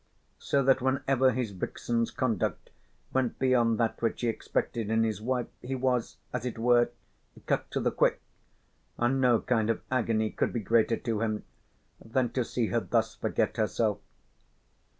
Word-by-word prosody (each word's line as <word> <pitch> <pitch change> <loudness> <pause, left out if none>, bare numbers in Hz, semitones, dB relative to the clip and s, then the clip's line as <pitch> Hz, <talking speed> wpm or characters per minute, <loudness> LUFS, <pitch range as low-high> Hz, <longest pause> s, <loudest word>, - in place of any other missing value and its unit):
So 140 -1 +1
that 130 0 +4
whenever 130 0 +2
his 120 -3 -2
vixen's 115 +4 -2
conduct 115 -7 -2 0.4
went 130 -2 0
beyond 120 -3 +3
that 115 -1 0
which 115 -1 -1
he 120 - +1
expected 115 -1 -2
in 110 0 +3
his 110 -3 -1
wife 125 +1 0 0.2
he 130 +2 -3
was, 125 -2 0 0.2
as 125 -2 -2
it 125 -2 -4
were, 120 +1 +4 0.6
cut - - 0
to - - -2
the - - +1
quick, - - +2 0.8
and 130 +3 +1
no 120 -3 +4
kind 115 -3 +1
of 115 - -1
agony 115 -4 +1
could - - -1
be 120 - 0
greater 115 +2 +2
to 115 -3 -2
him 110 -2 -1 0.6
than 120 +1 0
to 125 0 0
see 115 -1 -1
her 120 - +2
thus 115 -1 0
forget 110 0 -1
herself. 110 -1 +1
120 Hz, 165 wpm, -29 LUFS, 110-125 Hz, 0.8 s, that